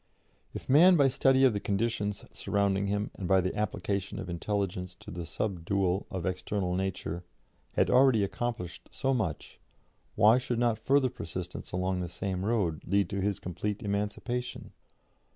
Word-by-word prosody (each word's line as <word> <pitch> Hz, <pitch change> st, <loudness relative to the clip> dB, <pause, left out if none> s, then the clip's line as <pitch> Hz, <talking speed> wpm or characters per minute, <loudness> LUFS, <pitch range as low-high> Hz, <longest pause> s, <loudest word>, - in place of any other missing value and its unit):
If -, -, -7 dB
man 170 Hz, +7 st, +7 dB
by 140 Hz, -4 st, +5 dB
study 135 Hz, +1 st, +3 dB
of 130 Hz, -4 st, +6 dB
the 100 Hz, -, -1 dB
conditions 105 Hz, 0 st, -1 dB
surrounding 100 Hz, -1 st, 0 dB
him 105 Hz, +1 st, -1 dB
and 95 Hz, -, -5 dB
by 95 Hz, +1 st, +5 dB
the 95 Hz, 0 st, -1 dB
application 100 Hz, -1 st, -2 dB
of 90 Hz, -1 st, -5 dB
intelligence 90 Hz, 0 st, -2 dB
to 110 Hz, +3 st, -11 dB
the 85 Hz, -2 st, -5 dB
subdual 95 Hz, +1 st, -1 dB
of 95 Hz, -3 st, -4 dB
external 95 Hz, 0 st, -1 dB
nature, 90 Hz, -3 st, -3 dB, 0.5 s
had -, -, +2 dB
already 125 Hz, -5 st, +5 dB
accomplished 100 Hz, -4 st, -4 dB
so 135 Hz, 0 st, 0 dB
much, 95 Hz, -, -3 dB, 0.6 s
why 110 Hz, +3 st, +6 dB
should 125 Hz, -2 st, -2 dB
not 120 Hz, -2 st, +1 dB
further 135 Hz, -2 st, +3 dB
persistence 90 Hz, -4 st, -6 dB
along 90 Hz, 0 st, -1 dB
the 90 Hz, -1 st, -3 dB
same 95 Hz, +1 st, -3 dB
road 100 Hz, -8 st, 0 dB
lead 100 Hz, +2 st, +1 dB
to 100 Hz, -1 st, -1 dB
his 100 Hz, -1 st, 0 dB
complete 100 Hz, +5 st, -4 dB
emancipation? 105 Hz, +5 st, -3 dB
100 Hz, 155 wpm, -30 LUFS, 90-115 Hz, 0.6 s, man